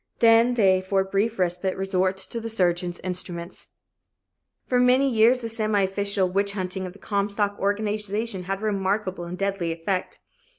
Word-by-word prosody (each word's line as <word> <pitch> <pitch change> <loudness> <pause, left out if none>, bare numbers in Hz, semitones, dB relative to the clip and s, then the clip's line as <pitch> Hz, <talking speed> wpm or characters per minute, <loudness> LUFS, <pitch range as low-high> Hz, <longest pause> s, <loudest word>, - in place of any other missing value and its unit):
Then 230 +1 +5
they 190 -5 +4
for 190 +1 +1
a - - -2
brief 200 +4 0
respite 180 +1 -1
resort 190 0 0
to 230 +4 -4
the 230 - -5
surgeon's 175 -4 0
instruments. 180 -2 -4 1.0
For 250 - +1
many 250 +2 +4
years 240 +1 +4
the 230 - -3
semi 215 -3 +1
official 200 0 0
witch 200 +2 0
hunting 185 -1 -4
of 180 - -9
the - - -15
Comstock 205 0 -1
organization 205 0 -2
had 195 +2 -3
a - - -3
remarkable 195 -3 -1
and 175 +1 -6
a - - -12
deadly 195 -3 -1
effect. 175 +3 -3
195 Hz, 170 wpm, -25 LUFS, 185-215 Hz, 1.0 s, Then